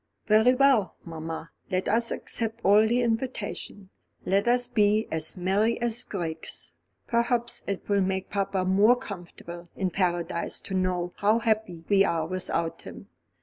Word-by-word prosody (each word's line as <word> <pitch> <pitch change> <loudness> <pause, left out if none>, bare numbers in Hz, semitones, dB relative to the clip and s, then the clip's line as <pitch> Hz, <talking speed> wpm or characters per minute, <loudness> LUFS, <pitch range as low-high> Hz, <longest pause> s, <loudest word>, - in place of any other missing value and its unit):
"Very 220 +4 +5
well, 265 -7 +3
mamma, 165 -1 -6 0.2
let 185 0 -1
us 230 +2 +2
accept 225 0 -3
all 210 +3 +6
the 245 +2 +2
invitations. 225 -4 -3 0.4
Let 195 +4 +2
us 245 0 +3
be 215 -2 +2
as 160 +3 -2
merry 200 +5 +1
as 235 -1 -1
grigs. 165 -5 -6 0.3
Perhaps 240 0 0
it 200 -1 -4
will 200 -1 +2
make 190 0 -2
papa 195 -2 -1
more 200 +6 +5
comfortable 175 -5 -9
in 190 -2 -1
Paradise 175 -2 -1
to 195 - -7
know 180 -1 -1
how 210 +2 +3
happy 220 -7 -1
we 195 -1 +5
are 165 -4 0
without 170 -2 -2
him. - - -11
200 Hz, 145 wpm, -27 LUFS, 180-230 Hz, 0.4 s, all